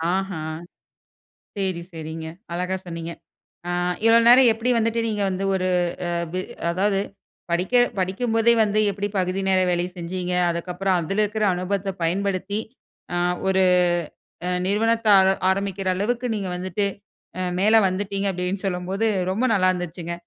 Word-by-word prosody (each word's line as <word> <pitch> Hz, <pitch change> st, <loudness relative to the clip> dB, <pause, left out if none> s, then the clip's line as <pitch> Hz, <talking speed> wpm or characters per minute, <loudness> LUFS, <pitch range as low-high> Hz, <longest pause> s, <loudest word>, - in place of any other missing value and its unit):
ஆஹம். 160 Hz, -5 st, -4 dB, 1.0 s
சரி, 190 Hz, -3 st, -2 dB
சரிங்க. 160 Hz, 0 st, -6 dB, 0.3 s
அழகா 180 Hz, +2 st, -1 dB
சொன்னீங்க. 165 Hz, -1 st, -6 dB, 0.6 s
ஆ. -, -, -1 dB, 0.3 s
இவ்ளோ 225 Hz, 0 st, +7 dB
நேரம் 245 Hz, 0 st, +8 dB
எப்டி 225 Hz, +3 st, -2 dB
வந்துட்டு 230 Hz, 0 st, +1 dB
நீங்க 210 Hz, -2 st, -2 dB
வந்து 190 Hz, +1 st, -3 dB
ஒரு 185 Hz, -1 st, 0 dB, 0.4 s
அ -, -, -2 dB, 0.6 s
அதாவது 195 Hz, +2 st, +1 dB, 0.5 s
படிக்க 180 Hz, +7 st, -1 dB, 0.3 s
படிக்கும்போதே 225 Hz, +5 st, +2 dB
வந்து 210 Hz, 0 st, +1 dB
எப்டி 200 Hz, +1 st, -3 dB
பகுதி 185 Hz, +1 st, 0 dB
நேர 190 Hz, -1 st, +3 dB
வேலை 175 Hz, 0 st, +1 dB
செஞ்சிங்க? 180 Hz, +1 st, -3 dB, 0.2 s
அதுக்கப்புறம் 180 Hz, +2 st, -1 dB
அதுல 195 Hz, +6 st, -1 dB
இருக்கிற 210 Hz, +1 st, -1 dB
அனுபவத்த 190 Hz, +2 st, -2 dB
பயன்படுத்தி 195 Hz, +3 st, -1 dB, 0.6 s
ஆ -, -, 0 dB, 0.3 s
ஒரு 190 Hz, 0 st, +3 dB, 0.8 s
அ -, -, 0 dB, 0.2 s
நிறுவனத்த 225 Hz, +3 st, +1 dB
ஆர 190 Hz, -, +4 dB, 0.2 s
ஆரம்பிக்கிற 195 Hz, 0 st, -1 dB
அளவுக்கு 240 Hz, +6 st, -1 dB
நீங்க 200 Hz, -3 st, -3 dB
வந்துட்டு 185 Hz, +3 st, -2 dB, 0.5 s
அ -, -, -1 dB, 0.2 s
மேல 215 Hz, +3 st, +4 dB
வந்துட்டீங்க 195 Hz, +1 st, -2 dB
அப்டின்னு 180 Hz, +2 st, -3 dB
சொல்லும்போது 190 Hz, +3 st, -1 dB, 0.3 s
ரொம்ப 220 Hz, +7 st, 0 dB
நல்லா 185 Hz, -3 st, +3 dB
இருந்துச்சுங்க. 175 Hz, -1 st, -5 dB
190 Hz, 135 wpm, -23 LUFS, 180-205 Hz, 1.0 s, நேரம்